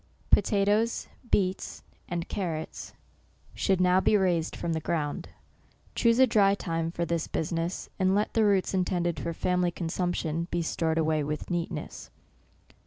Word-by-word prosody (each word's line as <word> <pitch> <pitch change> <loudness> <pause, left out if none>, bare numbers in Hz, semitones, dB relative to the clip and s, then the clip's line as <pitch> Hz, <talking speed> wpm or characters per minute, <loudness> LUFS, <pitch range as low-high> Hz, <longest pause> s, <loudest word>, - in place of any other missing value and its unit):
POTATOES, 210 +2 +2 0.2
BEETS, 185 -1 0 0.3
and 175 -1 -3
CARROTS, 165 -5 -4 0.6
should 190 -2 +1
now 180 0 +4
be 210 - +4
raised 175 -4 +1
from 170 - -2
the 160 - -1
ground. 150 -2 -2 0.3
— - - -33
Choose 230 0 +3
a 260 - +7
dry 200 -4 +4
time 165 -4 -2
for 170 0 -2
this 170 -1 -1
business, 165 +2 -2
and 190 0 +3
let 210 +1 0
the 225 - +3
roots 200 -3 +2
intended 175 -2 0
for 170 - -3
family 180 +1 +1
consumption, 170 -1 -2
be 175 -1 -1
stored 160 0 0
away 155 -1 +1
with 150 +4 -4
neatness. 170 -3 -4
175 Hz, 150 wpm, -28 LUFS, 165-190 Hz, 0.6 s, a